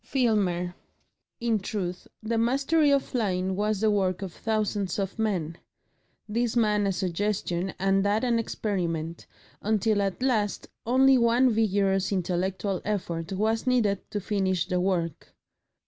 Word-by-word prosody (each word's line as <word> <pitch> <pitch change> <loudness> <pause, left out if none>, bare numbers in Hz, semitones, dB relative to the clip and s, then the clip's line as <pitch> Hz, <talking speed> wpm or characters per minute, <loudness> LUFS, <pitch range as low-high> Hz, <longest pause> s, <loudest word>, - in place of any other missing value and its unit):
FILMER 195 -9 +1 0.7
In 230 -2 +1
truth 185 -2 -4 0.2
the 225 +1 0
mastery 275 +6 +2
of 280 -1 +3
flying 190 -5 -1
was 210 0 0
the 220 -1 +3
work 190 -2 0
of 185 -3 -6
thousands 210 -4 -1
of 195 +1 -3
men 175 -7 -1 0.7
this 230 +2 -1
man 210 -3 +2
a - - +2
suggestion 185 0 -2
and 195 +1 +2
that 205 +3 +1
an 235 -2 +2
experiment, 170 -7 -3 0.3
until 215 0 +1
at 195 +5 -2
last 220 -6 0 0.2
only 265 +1 +5
one 240 +2 +4
vigorous 200 -3 +1
intellectual 185 +1 -1
effort 175 -4 -3
was 220 +5 0
needed 220 -6 +1
to 205 - -2
finish 190 -3 0
the 180 -1 0
work. 175 -4 -2
205 Hz, 135 wpm, -27 LUFS, 185-225 Hz, 0.7 s, only